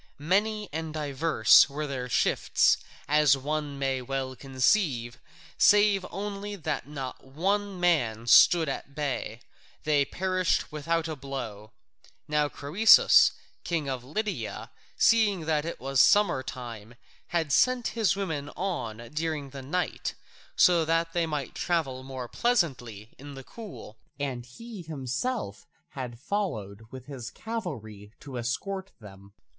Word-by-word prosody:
Many 210 Hz, +7 st, 0 dB
and 160 Hz, 0 st, -4 dB
divers 145 Hz, -4 st, +4 dB
were 150 Hz, +2 st, -4 dB
their 130 Hz, -3 st, -4 dB
shifts, -, -, +3 dB, 0.3 s
as 150 Hz, -2 st, +4 dB
one 145 Hz, +1 st, -3 dB
may 135 Hz, -1 st, -1 dB
well 130 Hz, 0 st, -3 dB
conceive, 130 Hz, -, 0 dB, 0.4 s
save 205 Hz, -2 st, +5 dB
only 205 Hz, +1 st, -5 dB
that 155 Hz, -6 st, -4 dB
not 135 Hz, -3 st, -7 dB
one 195 Hz, +8 st, -2 dB
man 125 Hz, -11 st, +1 dB
stood 165 Hz, +6 st, +6 dB
at 140 Hz, 0 st, -5 dB
bay: 130 Hz, -6 st, -3 dB, 0.4 s
they 150 Hz, -2 st, +3 dB
perished 185 Hz, +3 st, 0 dB
without 165 Hz, +2 st, -1 dB
a 160 Hz, -, -4 dB
blow. 120 Hz, -6 st, -7 dB, 0.5 s
Now 150 Hz, -1 st, +1 dB
Croesus, 175 Hz, +13 st, +6 dB, 0.3 s
king 165 Hz, -4 st, -2 dB
of 130 Hz, -2 st, -3 dB
Lydia, 205 Hz, -, -4 dB, 0.3 s
seeing 215 Hz, -5 st, +4 dB
that 155 Hz, -1 st, 0 dB
it 170 Hz, -, -5 dB
was 135 Hz, -1 st, +2 dB
summer 200 Hz, -10 st, +4 dB
time, 120 Hz, -3 st, -8 dB, 0.3 s
had 165 Hz, -4 st, -1 dB
sent 255 Hz, -2 st, +3 dB
his 220 Hz, -3 st, +1 dB
women 160 Hz, -8 st, -3 dB
on 170 Hz, -, -3 dB, 0.2 s
during 155 Hz, -3 st, -3 dB
the 135 Hz, 0 st, -8 dB
night, 160 Hz, +7 st, -3 dB, 0.4 s
so 175 Hz, -, +5 dB
that 165 Hz, +1 st, 0 dB
they 170 Hz, -1 st, +1 dB
might 150 Hz, -4 st, -4 dB
travel 150 Hz, -7 st, -1 dB
more 130 Hz, -2 st, -7 dB
pleasantly 125 Hz, -, -1 dB
in 140 Hz, +1 st, -9 dB
the 135 Hz, -, -9 dB
cool, 175 Hz, -, -11 dB, 0.2 s
and 125 Hz, -4 st, -4 dB
he 225 Hz, -, -10 dB
himself 150 Hz, -, -4 dB, 0.2 s
had 125 Hz, -5 st, -7 dB
followed 110 Hz, -, -4 dB
with 130 Hz, 0 st, -10 dB
his 130 Hz, -5 st, -7 dB
cavalry 115 Hz, -, -7 dB
to 130 Hz, -4 st, -6 dB
escort 190 Hz, +11 st, -4 dB
them. 100 Hz, -2 st, -14 dB
150 Hz, 130 wpm, -28 LUFS, 130-180 Hz, 0.5 s, stood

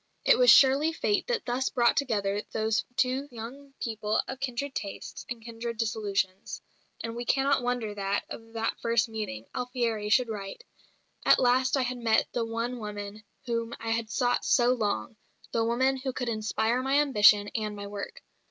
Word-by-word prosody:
It -, -, +5 dB
was -, -, +6 dB
surely 280 Hz, +4 st, +6 dB
fate 410 Hz, +3 st, 0 dB
that 480 Hz, -2 st, -1 dB
thus 255 Hz, +2 st, 0 dB
brought 240 Hz, -1 st, +3 dB
together 205 Hz, -7 st, 0 dB
these 220 Hz, 0 st, 0 dB
two 260 Hz, +3 st, +1 dB
young 255 Hz, +5 st, -9 dB
people 220 Hz, -2 st, -1 dB
of 265 Hz, -, -6 dB
kindred 270 Hz, +1 st, -3 dB
tastes 200 Hz, -1 st, -6 dB
and 235 Hz, -2 st, -6 dB
kindred 230 Hz, 0 st, -5 dB
disillusions; 205 Hz, -4 st, -2 dB, 0.4 s
and 230 Hz, 0 st, -4 dB
we 240 Hz, -, -4 dB
cannot 275 Hz, +2 st, +2 dB
wonder 245 Hz, -3 st, -2 dB
that, 200 Hz, 0 st, -1 dB
of 225 Hz, 0 st, -10 dB
that 225 Hz, 0 st, -2 dB
first 230 Hz, -1 st, +2 dB
meeting, 210 Hz, -, -5 dB
Alfieri 235 Hz, -4 st, -2 dB
should 250 Hz, +3 st, +4 dB
write, 205 Hz, -, -6 dB, 0.6 s
"At -, -, +6 dB
last 255 Hz, +2 st, +3 dB
I 265 Hz, -, +2 dB
had 250 Hz, 0 st, -3 dB
met 225 Hz, -2 st, +2 dB
the 235 Hz, -, -1 dB
one 230 Hz, +2 st, -3 dB
woman 210 Hz, -1 st, -6 dB, 0.2 s
whom 230 Hz, -1 st, -2 dB
I 225 Hz, 0 st, -3 dB
had 225 Hz, -1 st, -1 dB
sought 245 Hz, +2 st, +1 dB
so 245 Hz, 0 st, +4 dB
long, 210 Hz, -, -2 dB, 0.3 s
the 230 Hz, -, +1 dB
woman 260 Hz, +4 st, +2 dB
who 260 Hz, 0 st, -4 dB
could 245 Hz, -1 st, -3 dB
inspire 220 Hz, +2 st, 0 dB
my 270 Hz, +2 st, +2 dB
ambition 210 Hz, -7 st, +5 dB
and 215 Hz, -1 st, -3 dB
my 200 Hz, 0 st, -7 dB
work. 200 Hz, 0 st, -7 dB
230 Hz, 175 wpm, -28 LUFS, 215-255 Hz, 0.6 s, was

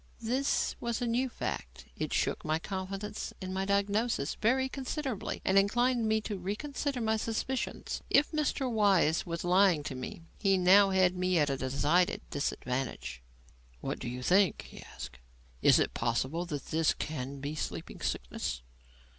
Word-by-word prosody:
This 260 Hz, +5 st, +1 dB
was 235 Hz, -1 st, -2 dB
a 245 Hz, -, -1 dB
new 245 Hz, +3 st, +1 dB
fact. -, -, -5 dB
It -, -, -3 dB
shook -, -, 0 dB
my 155 Hz, -1 st, +1 dB
confidence 195 Hz, +4 st, -5 dB
in 185 Hz, -1 st, -5 dB
my 190 Hz, 0 st, -1 dB
diagnosis 200 Hz, -4 st, +1 dB
very 260 Hz, +4 st, +2 dB
considerably, 265 Hz, -3 st, -4 dB
and 190 Hz, +1 st, +5 dB
inclined 240 Hz, +3 st, +2 dB
me 220 Hz, 0 st, +2 dB
to 210 Hz, -2 st, -4 dB
reconsider 275 Hz, +8 st, -3 dB
my 220 Hz, -1 st, +1 dB
suspicions. 230 Hz, +4 st, -3 dB
If 290 Hz, +2 st, +4 dB
Mr. 300 Hz, -3 st, 0 dB
Weiss 200 Hz, -9 st, +3 dB
was 170 Hz, -1 st, -3 dB
lying 180 Hz, -3 st, +4 dB
to 145 Hz, -, -4 dB
me, 130 Hz, +5 st, -7 dB, 0.2 s
he 195 Hz, -2 st, +3 dB
now 195 Hz, +2 st, +6 dB
had 185 Hz, -1 st, +3 dB
me 180 Hz, 0 st, +1 dB
at 145 Hz, -3 st, +3 dB
a 135 Hz, -, -1 dB
decided 145 Hz, +7 st, +1 dB
disadvantage. 125 Hz, -, -3 dB, 0.6 s
"What -, -, -4 dB
do -, -, -4 dB
you 125 Hz, +1 st, -5 dB
think?" 190 Hz, +5 st, +3 dB
he -, -, -12 dB
asked. 65 Hz, 0 st, -9 dB, 0.4 s
"Is -, -, +7 dB
it -, -, +1 dB
possible 130 Hz, +9 st, -1 dB
that 145 Hz, -4 st, -4 dB
this 160 Hz, 0 st, +2 dB
can 140 Hz, -2 st, -4 dB
be 140 Hz, +2 st, -4 dB
sleeping 90 Hz, -, -5 dB
sickness?" -, -, -3 dB
190 Hz, 160 wpm, -31 LUFS, 150-225 Hz, 0.6 s, Is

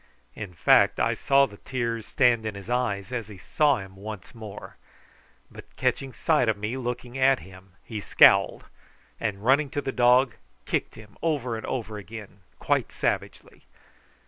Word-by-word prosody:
In 100 Hz, -5 st, -8 dB
fact -, -, +4 dB
I -, -, +2 dB
saw 140 Hz, -1 st, +3 dB
the 105 Hz, -5 st, -12 dB
tears 115 Hz, -3 st, -3 dB
stand 120 Hz, -4 st, +3 dB
in 110 Hz, -2 st, -4 dB
his 100 Hz, +4 st, -8 dB
eyes 110 Hz, -5 st, -1 dB
as 120 Hz, -4 st, -3 dB
he 105 Hz, -3 st, -11 dB
saw 145 Hz, -, +2 dB
him 95 Hz, -2 st, -9 dB
once 100 Hz, -1 st, -9 dB
more; 110 Hz, -3 st, -10 dB, 0.7 s
but -, -, -14 dB
catching 135 Hz, -1 st, -1 dB
sight 150 Hz, -4 st, +1 dB
of 110 Hz, -, +1 dB
me 105 Hz, +4 st, -3 dB
looking 125 Hz, 0 st, -5 dB
at 135 Hz, 0 st, +5 dB
him 95 Hz, 0 st, -15 dB
he 110 Hz, -2 st, -6 dB
scowled, -, -, +5 dB, 0.5 s
and, 105 Hz, -2 st, -3 dB
running 140 Hz, +3 st, +4 dB
to 145 Hz, -, -3 dB
the 135 Hz, -, -3 dB
dog, 125 Hz, 0 st, +4 dB, 0.3 s
kicked -, -, -2 dB
him 105 Hz, -2 st, -15 dB
over 140 Hz, -8 st, -1 dB
and 110 Hz, -, -6 dB
over 110 Hz, -4 st, -4 dB
again 105 Hz, -1 st, -10 dB, 0.2 s
quite -, -, 0 dB
savagely. -, -, -3 dB
115 Hz, 165 wpm, -26 LUFS, 105-130 Hz, 0.7 s, at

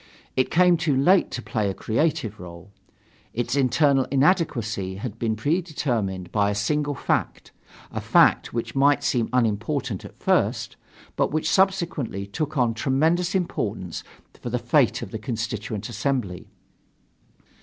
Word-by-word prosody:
It 130 Hz, -, +2 dB
came 180 Hz, 0 st, +4 dB
too 155 Hz, -4 st, +1 dB
late 180 Hz, +8 st, +4 dB
to 120 Hz, -, -5 dB
play 105 Hz, -2 st, -1 dB
a 95 Hz, -, -4 dB
creative 115 Hz, -3 st, -1 dB
role. 85 Hz, +2 st, -11 dB, 0.6 s
Its 120 Hz, +3 st, -1 dB
internal 135 Hz, 0 st, +3 dB
inadequacy 125 Hz, -, +1 dB
had 110 Hz, +2 st, -6 dB
been 110 Hz, -2 st, 0 dB
predetermined 120 Hz, -, -1 dB
by 100 Hz, -1 st, +2 dB
a 100 Hz, -, -1 dB
single 145 Hz, +8 st, 0 dB
fact -, -, -2 dB, 0.4 s
a -, -, -4 dB
fact -, -, +4 dB
which 115 Hz, -1 st, -3 dB
might 145 Hz, +1 st, +3 dB
seem 120 Hz, -4 st, +1 dB
unimportant 115 Hz, -1 st, -1 dB
at -, -, -12 dB
first, -, -, 0 dB, 0.4 s
but -, -, +1 dB
which 155 Hz, +1 st, -1 dB
subsequently 170 Hz, -, +1 dB
took 150 Hz, +9 st, -4 dB
on 120 Hz, -3 st, +2 dB
tremendous 160 Hz, -, +1 dB
importance 105 Hz, -, -2 dB, 0.4 s
for -, -, -4 dB
the -, -, 0 dB
fate -, -, +2 dB
of -, -, -8 dB
the 110 Hz, -, -5 dB
Constituent 110 Hz, -2 st, -4 dB
Assembly. 110 Hz, -5 st, -2 dB
125 Hz, 140 wpm, -24 LUFS, 105-150 Hz, 0.6 s, came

